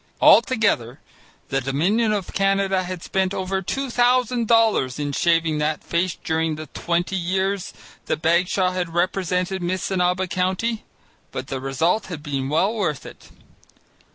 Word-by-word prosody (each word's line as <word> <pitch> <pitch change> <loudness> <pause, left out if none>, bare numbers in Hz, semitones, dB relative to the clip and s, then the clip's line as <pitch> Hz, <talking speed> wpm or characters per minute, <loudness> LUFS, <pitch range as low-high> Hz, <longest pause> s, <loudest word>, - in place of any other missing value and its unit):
Altogether 200 - +4 0.5
the 135 0 0
Dominion 180 - +1
of 200 -4 -3
Canada 195 -1 +1
had 185 -1 -6
spent 190 0 -1
over 190 +1 -2
two 270 +8 -3
thousand 245 -1 +2
dollars 220 - +3
in 145 -1 -2
shaving 165 0 +1
that 150 0 -1
face 170 +1 -1
during 160 0 0
the 155 +1 -7
twenty 175 +4 -2
years 190 +2 -1 0.4
that - - -1
Bagshaw 180 +3 +2
had 180 -2 -3
represented 180 +1 0
Missinaba 180 0 0
County. 190 +5 -1 0.5
But 130 0 -6
the 135 - -3
result 160 +10 0
had 160 -5 -7
been 135 -3 -3
well 185 +8 +2
worth 180 -11 -2
it. - - -13
180 Hz, 140 wpm, -22 LUFS, 160-195 Hz, 0.5 s, Altogether